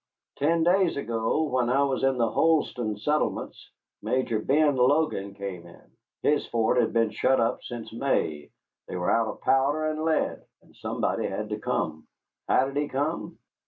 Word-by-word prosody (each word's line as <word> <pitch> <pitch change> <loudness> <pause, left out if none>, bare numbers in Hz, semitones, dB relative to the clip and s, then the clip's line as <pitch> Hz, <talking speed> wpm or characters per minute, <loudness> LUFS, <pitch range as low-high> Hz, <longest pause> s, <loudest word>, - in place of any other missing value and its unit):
Ten 165 +3 +2
days 180 -1 +3
ago, 115 +3 0
when 130 -5 0
I 135 +3 +3
was 135 -2 0
in 135 -1 +2
the 115 -1 +2
Holston 125 -7 +1
settlements, 150 +8 -2 0.3
Major 130 -4 0
Ben 145 +5 +3
Logan 125 -6 +1
came 95 -4 -6
in. 85 - -18 0.3
His 150 0 +2
fort 115 +1 +2
had - - 0
been 115 -2 +2
shut 130 +1 +2
up 115 - 0
since 120 -2 -8
May, 80 - -1 0.4
they - - -6
were 90 -1 0
out 115 -1 +2
of - - -7
powder 140 +4 +2
and 155 0 -2
lead, 160 -1 0 0.2
and - - -23
somebody - - -2
had - - -4
to - - -3
come. 80 0 -2 0.4
How 130 - +4
did 135 +1 -5
he 145 0 0
come? 145 +4 -3
130 Hz, 170 wpm, -26 LUFS, 115-150 Hz, 0.4 s, How